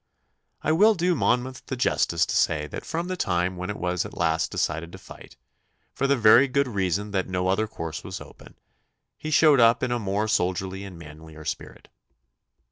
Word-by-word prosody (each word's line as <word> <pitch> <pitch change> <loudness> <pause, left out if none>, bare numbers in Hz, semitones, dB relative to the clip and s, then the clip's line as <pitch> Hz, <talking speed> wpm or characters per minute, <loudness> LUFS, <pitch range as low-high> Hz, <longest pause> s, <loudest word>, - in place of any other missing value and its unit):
I 155 - +1
will 210 +7 +5
do 180 0 +1
Monmouth 130 -3 0
the 130 - -3
justice 85 -8 +1
to - - -3
say 75 -1 +1
that 75 - -8
from 170 +1 -3
the 185 - -3
time 90 - -1
when 90 +1 -5
it 105 - -4
was 90 -1 -1
at - - -10
last 80 -1 +1
decided 80 +2 -2
to - - -8
fight 95 - -14 0.6
for 135 - 0
the 140 0 +2
very 115 +4 +6
good 140 +1 +1
reason 100 -2 -1
that 95 -2 -1
no 90 0 -1
other 105 +3 +1
course 80 -7 -6
was 95 0 -6
open - - -14 0.6
he 155 - -6
showed 155 -2 +5
up 115 +1 +4
in 125 - 0
a 120 - 0
more 100 0 -1
soldierly 95 0 -1
and 95 -3 -10
manlier 80 0 -12
spirit. - - -6
100 Hz, 195 wpm, -25 LUFS, 90-130 Hz, 0.6 s, very